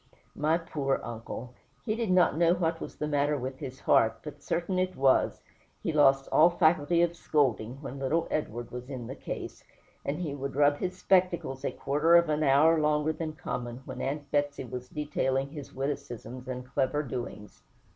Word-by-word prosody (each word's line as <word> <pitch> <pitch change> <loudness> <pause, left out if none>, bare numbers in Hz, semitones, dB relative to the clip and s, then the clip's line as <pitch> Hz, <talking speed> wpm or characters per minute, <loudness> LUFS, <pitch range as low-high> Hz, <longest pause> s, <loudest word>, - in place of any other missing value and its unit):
My 155 +2 +2
poor 145 -5 -1
uncle! 120 +1 -7 0.3
he 215 - 0
did 230 -3 -2
not 180 -3 +4
know 170 +1 +4
what 165 -2 -1
was - - -7
the 150 - -3
matter 145 0 +1
with 130 0 -5
his 130 0 -7
heart, 115 0 +3
but 150 - -9
certain 180 +2 -1
it 185 0 -1
was, 135 -1 +2 0.4
he 165 - -1
lost 135 -2 +4
all 165 +3 +7
faculty 170 -1 +3
of 170 0 0
scolding 130 -6 0
when 135 0 -6
little 160 +5 0
Edward 120 -6 -3
was 125 +1 -7
in 130 -4 -5
the - - -6
case, - - -7 0.4
and 140 +2 -2
he 165 -5 -3
would 140 -1 -5
rub 145 0 +4
his 185 +2 -3
spectacles 180 -9 +1
a - - -1
quarter 150 +5 +2
of 170 -2 +5
an 150 0 +1
hour 155 +3 +5
longer 150 +1 +2
than 155 0 -4
common 120 -4 -5
when - - -6
Aunt 145 +1 -3
Betsey 145 -1 0
was 125 0 -7
detailing 140 -2 -1
his 145 -3 -8
witticisms 130 -3 -5
and 125 -1 -5
clever 135 +3 0
doings. 120 -5 -7
145 Hz, 185 wpm, -29 LUFS, 130-160 Hz, 0.4 s, all